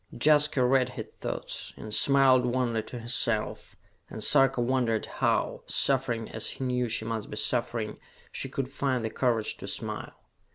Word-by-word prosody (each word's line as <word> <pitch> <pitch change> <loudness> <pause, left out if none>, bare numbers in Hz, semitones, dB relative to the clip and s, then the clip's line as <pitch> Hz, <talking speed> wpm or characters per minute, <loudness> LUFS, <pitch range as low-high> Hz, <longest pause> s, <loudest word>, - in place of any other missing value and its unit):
Jaska 150 -2 +4
read 130 0 +3
his - - -6
thoughts, - - -5
and 110 - -7
smiled 135 -1 +5
wanly 120 -2 0
to 120 - -9
herself, 115 -2 -2 0.3
and 110 - -5
Sarka 135 0 +4
wondered 120 -2 +1
how, - - 0
suffering 125 -4 +1
as 110 - -4
he - - -6
knew 125 -1 0
she 110 0 -2
must 110 -1 -3
be 105 - -6
suffering, 115 -3 -1 0.3
she 135 - -4
could 135 -1 -3
find 130 -3 -1
the 110 - -3
courage 115 -4 0
to - - -8
smile. - - -5
125 Hz, 160 wpm, -28 LUFS, 115-130 Hz, 0.3 s, smiled